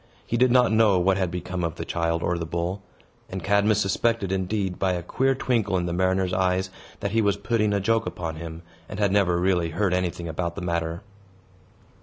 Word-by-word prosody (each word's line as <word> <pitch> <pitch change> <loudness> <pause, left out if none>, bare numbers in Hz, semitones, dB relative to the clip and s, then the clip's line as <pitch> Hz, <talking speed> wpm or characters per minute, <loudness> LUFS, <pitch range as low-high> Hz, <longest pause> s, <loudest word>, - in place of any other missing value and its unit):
He - - -2
did 125 +2 +4
not 125 -2 +5
know 110 -3 +4
what 95 +2 +2
had 95 -2 0
become 90 +1 -4
of 85 -1 -2
the 80 - -5
child 85 0 -1
or 85 0 0
the - - -2
bull; 85 +4 -3 0.5
and 95 -2 -5
Cadmus 100 +2 +3
suspected, 100 +1 0
indeed, 95 0 -1
by 95 -1 +1
a 90 -1 -3
queer 135 +9 +1
twinkle 110 -7 0
in 90 - -1
the 85 - -2
mariner's 95 +1 +1
eyes, 95 0 +1 0.3
that 100 -2 -2
he 115 +1 +2
was 100 -1 +2
putting 105 0 0
a 100 - +1
joke 115 +3 +1
upon 80 -2 -4
him, 80 0 -8 0.3
and - - -6
had 100 -2 +2
never 95 -3 +3
really 90 -2 +1
heard 95 +3 0
anything 90 -2 -2
about 85 +1 -3
the - - -5
matter. 85 +1 -2
95 Hz, 210 wpm, -25 LUFS, 85-100 Hz, 0.5 s, not